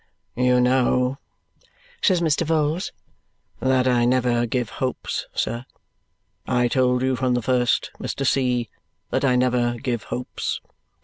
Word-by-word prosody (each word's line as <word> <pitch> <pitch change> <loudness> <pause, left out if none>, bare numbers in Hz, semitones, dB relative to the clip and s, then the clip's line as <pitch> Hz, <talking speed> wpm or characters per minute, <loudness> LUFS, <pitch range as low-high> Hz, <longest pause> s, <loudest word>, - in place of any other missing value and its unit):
"You 125 0 +3
know," 125 +1 +2 0.8
says 185 -4 +3
Mr. 160 -1 +2
Vholes, 160 +2 0 0.7
"that 130 -1 +2
I 120 -1 +3
never 120 -1 +2
give 120 -1 -2
hopes, 130 -1 -2
sir. 120 +1 -1 0.8
I 125 -1 +2
told 125 0 +2
you 130 0 +1
from 125 0 +1
the 125 - 0
first, 125 +2 +1
Mr. 135 - -3
C., 125 -3 +1 0.4
that - - 0
I 130 -2 +3
never 125 -1 +2
give 120 -2 -3
hopes. 125 - -4
125 Hz, 130 wpm, -23 LUFS, 125-130 Hz, 0.8 s, You